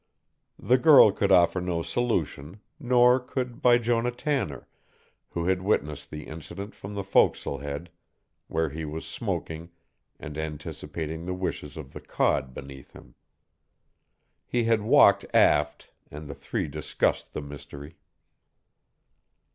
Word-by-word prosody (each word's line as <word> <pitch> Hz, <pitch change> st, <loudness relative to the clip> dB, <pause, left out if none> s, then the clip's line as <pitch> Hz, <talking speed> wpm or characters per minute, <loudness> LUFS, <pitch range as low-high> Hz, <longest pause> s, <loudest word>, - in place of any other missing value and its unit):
The 125 Hz, +1 st, +2 dB
girl 145 Hz, -8 st, +8 dB
could 100 Hz, 0 st, 0 dB
offer 90 Hz, 0 st, +4 dB
no 85 Hz, -2 st, -2 dB
solution, 90 Hz, -7 st, -2 dB, 0.2 s
nor 125 Hz, -2 st, +4 dB
could 125 Hz, -1 st, -5 dB
Bijonah 120 Hz, 0 st, +2 dB
Tanner, 130 Hz, -, -2 dB, 0.6 s
who 85 Hz, -1 st, -3 dB
had 95 Hz, 0 st, +1 dB
witnessed 75 Hz, -7 st, -1 dB
the 75 Hz, 0 st, -7 dB
incident 80 Hz, +6 st, -8 dB
from 100 Hz, +1 st, -9 dB
the 100 Hz, -, -3 dB
forecastle 85 Hz, -7 st, +2 dB
head 70 Hz, +4 st, -6 dB, 0.6 s
where 80 Hz, -1 st, -1 dB
he 80 Hz, +2 st, -5 dB
was 80 Hz, +1 st, -5 dB
smoking 80 Hz, +1 st, -4 dB, 0.5 s
and 75 Hz, +1 st, -7 dB
anticipating 80 Hz, +1 st, -5 dB
the 90 Hz, -, -2 dB
wishes 80 Hz, -5 st, -4 dB
of 70 Hz, -4 st, -9 dB
the -, -, -8 dB
cod 65 Hz, -, 0 dB
beneath 70 Hz, 0 st, -11 dB
him. -, -, -15 dB, 1.3 s
He 120 Hz, -1 st, 0 dB
had 115 Hz, -1 st, +2 dB
walked 105 Hz, -, +5 dB
aft, 75 Hz, 0 st, +3 dB, 0.2 s
and 75 Hz, +1 st, -9 dB
the 70 Hz, -, -6 dB
three 70 Hz, -1 st, -3 dB
discussed -, -, -2 dB
the -, -, -4 dB
mystery. 70 Hz, +1 st, -10 dB
85 Hz, 130 wpm, -27 LUFS, 75-115 Hz, 1.3 s, girl